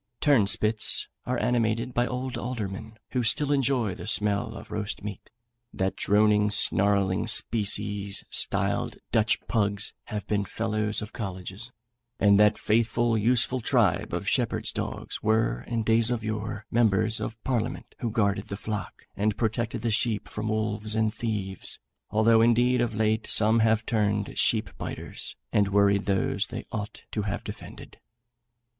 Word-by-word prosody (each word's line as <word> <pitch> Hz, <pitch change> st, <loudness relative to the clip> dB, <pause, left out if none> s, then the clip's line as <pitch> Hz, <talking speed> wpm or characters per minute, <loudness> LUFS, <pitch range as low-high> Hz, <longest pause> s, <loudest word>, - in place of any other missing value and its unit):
Turnspits 110 Hz, -5 st, +3 dB, 0.2 s
are 125 Hz, 0 st, 0 dB
animated 120 Hz, 0 st, 0 dB
by 120 Hz, 0 st, +1 dB
old 125 Hz, +2 st, -4 dB
aldermen, 110 Hz, -2 st, -5 dB
who 125 Hz, -, 0 dB
still 140 Hz, +5 st, +1 dB
enjoy 130 Hz, -7 st, +1 dB
the -, -, -8 dB
smell 105 Hz, -2 st, +1 dB
of -, -, -10 dB
the -, -, -8 dB
roast 105 Hz, -2 st, -4 dB
meat; 105 Hz, -3 st, -7 dB, 0.4 s
that 95 Hz, 0 st, -2 dB
droning, 105 Hz, 0 st, +3 dB
snarling 100 Hz, -1 st, +3 dB
species, 105 Hz, -2 st, +1 dB
styled -, -, +1 dB, 0.2 s
Dutch 110 Hz, 0 st, +2 dB
pugs, 105 Hz, -2 st, 0 dB
have 105 Hz, -1 st, -5 dB
been 105 Hz, -1 st, 0 dB
fellows 110 Hz, +1 st, -1 dB
of 105 Hz, -, -9 dB
colleges; 95 Hz, +2 st, -6 dB, 0.5 s
and 100 Hz, -1 st, +5 dB
that 105 Hz, 0 st, +5 dB
faithful, 115 Hz, +1 st, +1 dB
useful 120 Hz, +3 st, +2 dB
tribe -, -, +1 dB
of -, -, -3 dB
shepherds' -, -, 0 dB
dogs, -, -, -5 dB
were, 110 Hz, -, +1 dB
in 115 Hz, -1 st, -1 dB
days 115 Hz, +1 st, +3 dB
of 120 Hz, -3 st, -2 dB
yore, 110 Hz, -1 st, -4 dB
members 110 Hz, -1 st, +2 dB
of 115 Hz, -1 st, -5 dB
parliament, 120 Hz, -4 st, -2 dB
who 120 Hz, -, -2 dB
guarded 100 Hz, -2 st, 0 dB
the 100 Hz, -, -5 dB
flock, 105 Hz, 0 st, -6 dB
and 105 Hz, 0 st, 0 dB
protected 115 Hz, 0 st, -2 dB
the 115 Hz, -, 0 dB
sheep 110 Hz, 0 st, 0 dB
from 105 Hz, +1 st, -5 dB
wolves 110 Hz, 0 st, -2 dB
and 110 Hz, -1 st, +1 dB
thieves, 105 Hz, -5 st, -4 dB, 0.3 s
although 110 Hz, +1 st, +4 dB
indeed 120 Hz, +2 st, +3 dB
of 115 Hz, -3 st, -1 dB
late 110 Hz, +1 st, 0 dB
some 110 Hz, +1 st, +4 dB
have 110 Hz, 0 st, +2 dB
turned 105 Hz, -2 st, 0 dB
sheep 110 Hz, -3 st, +1 dB
biters, -, -, -5 dB, 0.2 s
and 100 Hz, -1 st, +3 dB
worried 100 Hz, 0 st, +3 dB
those 95 Hz, -1 st, +1 dB
they -, -, -7 dB
ought 105 Hz, 0 st, -6 dB
to 105 Hz, -, -2 dB
have 100 Hz, 0 st, -3 dB
defended. -, -, -10 dB
110 Hz, 150 wpm, -27 LUFS, 105-115 Hz, 0.5 s, and